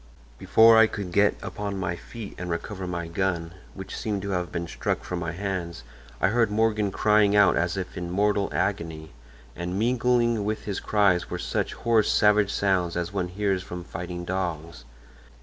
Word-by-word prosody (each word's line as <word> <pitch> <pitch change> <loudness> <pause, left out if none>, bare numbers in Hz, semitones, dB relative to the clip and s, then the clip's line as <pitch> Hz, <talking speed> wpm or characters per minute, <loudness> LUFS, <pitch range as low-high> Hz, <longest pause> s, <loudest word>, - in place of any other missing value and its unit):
"Before 115 0 +6
I 115 - +7
could 100 -4 -6
get 100 +3 +3
upon 100 -1 -4
my 95 -2 -2
feet 110 +3 -9
and 90 0 -5
recover 95 +3 -4
my 85 -2 -4
gun, 85 -1 -2 0.2
which 95 -1 -7
seemed 105 -3 -3
to 100 - -3
have 90 -2 -2
been 85 0 -3
struck - - -2
from 90 - -4
my 85 -2 -3
hands, 90 -2 -4 0.4
I 95 - +3
heard 115 +1 +2
Morgan 105 -1 +1
crying 105 +1 +3
out 100 -4 +5
as 85 +3 0
if 90 -1 -5
in 90 -1 -4
mortal 100 +2 +1
agony, 80 -5 -2 0.4
and 90 +2 -4
mingling 120 -1 +2
with 110 +1 -2
his 100 -2 -3
cries 95 -4 +2
were 90 - -3
such 90 - -2
hoarse, 115 -2 +2
savage 105 -1 +4
sounds 90 -3 0
as 85 +2 -3
one 95 -3 -1
hears 95 0 -1
from 90 -1 -7
fighting 90 0 -6
dogs. 85 -7 -4
95 Hz, 180 wpm, -26 LUFS, 90-105 Hz, 0.4 s, I